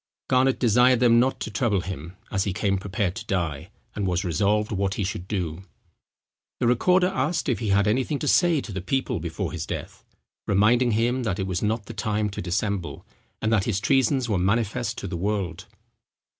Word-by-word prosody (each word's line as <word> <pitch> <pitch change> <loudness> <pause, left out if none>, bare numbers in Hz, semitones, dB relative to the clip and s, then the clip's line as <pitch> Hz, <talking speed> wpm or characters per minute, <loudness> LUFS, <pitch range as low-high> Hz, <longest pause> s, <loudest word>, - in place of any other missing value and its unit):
Garnet 130 +1 +3
desired 125 +1 +4
them 120 -1 +5
not 130 +2 +1
to 110 - -4
trouble 105 -5 +1
him, 90 -1 -7
as 100 -2 0
he 100 - -1
came 100 -1 0
prepared 100 -1 -2
to - - -6
die, 85 -7 -2 0.2
and 100 -2 -2
was 90 +1 0
resolved 100 +6 +1
what 100 -1 -1
he 105 - -1
should 90 -1 -4
do. 90 -5 -3 1.0
The - - +1
recorder 180 +10 +3
asked 160 +1 -1
if 125 - 0
he 115 - -3
had 100 +1 +3
anything 130 +7 +1
to 150 - -4
say 170 -1 +4
to 110 - -8
the 95 -1 -4
people 125 +1 -1
before 85 +2 -4
his 80 -2 -5
death, - - -6 0.4
reminding 115 +5 +3
him 120 +4 +1
that 110 -6 -1
it 95 - -2
was 90 -3 -2
not 110 0 -1
the 115 - -8
time 105 -1 -1
to - - -5
dissemble, 90 -4 -2 0.4
and 110 +1 +2
that 105 -4 +2
his 100 -5 0
treasons 130 +1 +2
were 105 -5 0
manifest 115 +5 0
to - - -5
the 90 - -4
world. 100 -1 -2
105 Hz, 200 wpm, -25 LUFS, 95-120 Hz, 1.0 s, them